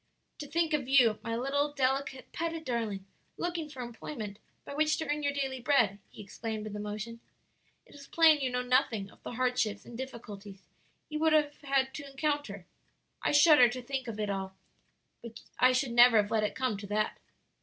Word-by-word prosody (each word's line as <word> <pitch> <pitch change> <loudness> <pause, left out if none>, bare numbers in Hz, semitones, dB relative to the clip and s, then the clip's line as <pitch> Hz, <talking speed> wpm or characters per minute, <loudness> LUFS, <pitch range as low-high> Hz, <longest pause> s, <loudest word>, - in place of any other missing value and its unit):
"To 295 - -6
think 330 +1 0
of 275 -4 -1
you, 245 -6 +5
my 230 -1 -3
little, 285 +4 0
delicate, 270 0 -1
petted 330 -1 -4
darling, 220 -6 -2 0.3
looking 340 -3 -3
for 260 -4 -7
employment 225 -3 -7 0.3
by - - -7
which 310 +1 +2
to 320 - -4
earn 295 +1 -1
your 285 -1 +1
daily 270 -2 -3
bread!" 240 -6 +2
he - - -11
exclaimed 220 +2 -5
with 215 -1 -6
emotion. 210 +3 -5 0.7
"It - - -19
is 280 -1 -13
plain 320 -3 +5
you 260 - 0
know 250 0 -1
nothing 245 -5 +1
of - - -22
the - - -7
hardships 240 -4 0
and 240 - -10
difficulties 210 -6 -8 0.4
you 305 -1 -4
would 320 0 +3
have 295 -1 +3
had 270 -2 +1
to 285 -2 -7
encounter. 275 - -2 0.6
I - - +1
shudder 295 -4 +7
to 250 +1 -5
think 265 0 -4
of 220 -2 -6
it 210 -1 -1
all. 190 -1 -4 0.7
But 235 -1 -10 0.2
I 255 +1 +6
should 255 0 0
never 240 -1 +7
have 205 0 +2
let 220 -1 +2
it 210 - -2
come 255 -5 -1
to 200 0 -8
that." 210 +1 -1
255 Hz, 195 wpm, -30 LUFS, 215-285 Hz, 0.7 s, shudder